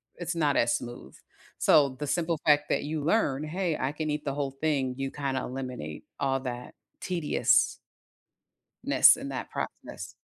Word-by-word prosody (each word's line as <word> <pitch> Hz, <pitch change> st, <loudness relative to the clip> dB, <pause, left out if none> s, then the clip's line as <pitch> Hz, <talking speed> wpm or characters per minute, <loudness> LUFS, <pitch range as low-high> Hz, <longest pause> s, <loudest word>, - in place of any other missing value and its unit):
it's 175 Hz, 0 st, -4 dB
not 150 Hz, -4 st, +2 dB
as 115 Hz, 0 st, +3 dB
smooth. 120 Hz, 0 st, -7 dB, 0.5 s
So, 145 Hz, -2 st, +5 dB
the 130 Hz, +3 st, -6 dB
simple 165 Hz, 0 st, 0 dB
fact 150 Hz, -1 st, +4 dB
that -, -, +1 dB
you 150 Hz, 0 st, -3 dB
learn, 155 Hz, -6 st, +1 dB
hey, 170 Hz, +1 st, -1 dB
I 130 Hz, -, 0 dB
can 155 Hz, +1 st, -3 dB
eat 150 Hz, 0 st, -2 dB
the 140 Hz, -, -1 dB
whole 140 Hz, -1 st, -1 dB
thing, 135 Hz, -3 st, -1 dB
you 135 Hz, 0 st, -3 dB
kinda 135 Hz, -2 st, -2 dB
eliminate 125 Hz, -, -6 dB
all 135 Hz, -1 st, +1 dB
that 125 Hz, -1 st, -6 dB, 0.3 s
tedious 170 Hz, -5 st, +2 dB, 1.1 s
ness -, -, +7 dB
and -, -, -6 dB
that -, -, -5 dB
process. -, -, -6 dB
145 Hz, 165 wpm, -28 LUFS, 130-155 Hz, 1.1 s, ness